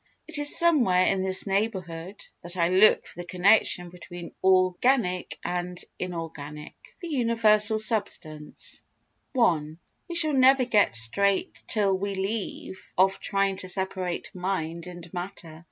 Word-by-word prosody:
It - - -4
is 290 +2 +5
somewhere 255 - +3
in 195 -1 0
this 190 0 0
neighbourhood 195 -3 -4 0.2
that 175 +1 -8
I 170 -1 +1
look 190 +4 +4
for - - -12
the 175 - -8
connection 180 -1 +2
between 175 -1 -11
organic 185 +2 +1
and 180 0 -4 0.2
inorganic. 160 -4 -7 0.3
The - - -5
Universal 225 -5 +2
Substance 200 -9 0 0.6
i 165 -11 +2 0.4
We 345 - -7
shall 310 -3 +4
never 265 -1 +4
get 210 - +2
straight 190 - +3
till 200 -3 +1
we 200 +1 -4
leave 195 -1 -5
off 190 +1 +2
trying 195 -1 -1
to 185 - -1
separate 185 -1 -2
mind 180 -3 -4
and 175 -1 -10
matter. 175 -3 -8
190 Hz, 135 wpm, -25 LUFS, 175-215 Hz, 0.6 s, is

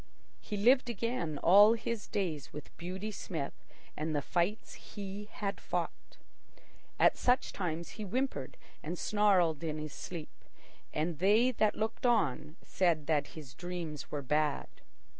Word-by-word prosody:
He 210 - -5
lived 250 +4 +4
again 230 - -2
all 205 +5 +8
his 230 -1 -3
days 165 -8 -2
with 150 - -10
Beauty 185 +5 -5
Smith 160 -8 -4 0.4
and 155 +1 -2
the 145 - +1
fights 180 +8 -1
he 205 0 -8
had 200 -1 -4
fought. - - -4 0.8
At - - +5
such 250 +1 +2
times 170 -3 -3
he 215 - -7
whimpered 245 - -2 0.2
and 170 +4 -4
snarled 185 -8 +3
in 155 -2 -2
his 155 -1 -5
sleep, 165 -4 -8 0.5
and 155 0 -2
they 215 +7 +5
that 215 -3 +2
looked 220 +3 -1
on 155 - +1
said 170 -5 +1
that 150 -2 +1
his 140 -5 -9
dreams 170 -1 -5
were 145 -2 -3
bad. 150 +1 +1
180 Hz, 140 wpm, -32 LUFS, 155-210 Hz, 0.8 s, all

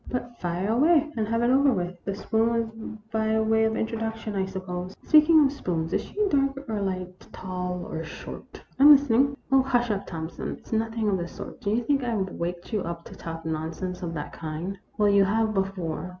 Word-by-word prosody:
But 240 -1 -4
fire 175 +2 -2
away 300 +5 +4
and 220 -2 -1
have 230 +1 0
it 240 - +3
over 275 +1 +5
with. 180 -4 -3
The 195 - -2
spoon 220 +2 +1
was 225 -1 -3
by 220 0 +1
way 220 0 +3
of 220 - +1
introduc 225 0 -2
tion, 215 -2 -6
I 190 -1 0
suppose. 185 -1 -5
Speaking 310 0 +6
of 270 - +2
spoons, 170 - -2
is - - +2
she 420 0 -1
dark 275 -3 0
or 215 -2 -2
light, 185 -2 -4
tall 180 -1 -4
or 160 - -4
short? 155 - -9 0.2
I - - +5
'm 295 - +12
listening." 275 0 +3
" - - -30
Oh, 270 0 +6
hush 245 -3 +1
up, 200 -1 -3
Thompson! 160 -1 -5
It - - -22
's - - -7
nothing 225 0 0
of 195 -2 +1
the 170 - -3
sort. 175 - -9
Do 205 - -2
you 230 +3 +1
think 275 +2 +1
I 235 -2 -1
Ve 190 -2 -1
waked 175 +5 -5
you 210 - +1
up 170 -1 -5
to - - -11
talk 165 0 -7
non 160 0 -2
sense 180 -1 -5
of 165 -2 -4
that 150 - -5
kind? 165 +5 -5
" - - -39
" - - -33
Well, 210 - +4
you 200 -1 +5
have 220 +2 +1
before. 185 -3 -2
215 Hz, 235 wpm, -26 LUFS, 180-240 Hz, 0.2 s, m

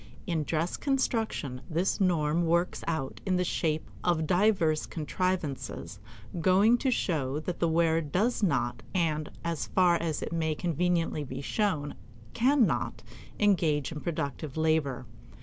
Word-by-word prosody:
In 160 -3 -1
dress 165 +4 -1
construction 225 - -1
this 175 +5 0
norm 170 -2 +2
works 170 +2 +1
out 160 -5 -3
in 190 -2 0
the 180 - +2
shape 160 -3 -1 0.2
of 165 -3 +1
divers 175 -4 +2
contrivances 155 - -3 0.4
going 200 +7 +4
to 270 - +1
show 150 - 0
that 175 +2 -4
the 170 - +2
wearer 165 0 +2
does 190 - 0
not 125 - 0
and, 155 -4 0
as 170 -3 -2
far 180 -2 +4
as 165 -3 -2
it - - -4
may 160 -2 0
conveniently 170 -2 0
be 130 -1 -6
shown, 150 -2 -1 0.4
can 260 +1 +4
not 120 - -2 0.4
engage 165 -9 +2
in 150 -2 -6
productive 150 -2 -4
labor. 155 -5 +1
165 Hz, 140 wpm, -29 LUFS, 150-185 Hz, 0.4 s, going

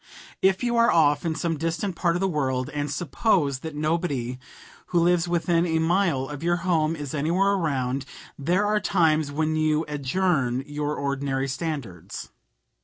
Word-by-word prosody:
If 190 +3 +3
you 240 -1 +1
are 235 0 +5
off 150 -1 +3
in 160 - -1
some 165 -3 -2
distant 165 +4 -2
part 170 -1 +1
of 175 - -1
the 195 - +2
world 130 -6 -1
and 145 0 -2
suppose 145 - +1
that 160 +1 -7
nobody 150 -6 -1 0.5
who 175 - +2
lives 175 0 +3
within 170 0 +1
a 160 -1 +1
mile 165 -5 +1
of 145 0 -7
your 175 +1 +2
home 165 -3 +2
is 145 -4 -6
anywhere 170 +7 +2
around, 135 -8 -1 0.3
there 175 +8 +1
are 210 0 +2
times 155 -7 +2
when 155 +2 0
you 155 0 +1
adjourn 140 -3 0
your 150 0 -3
ordinary 140 -1 -1
standards. 135 - -5
155 Hz, 165 wpm, -25 LUFS, 140-175 Hz, 0.5 s, are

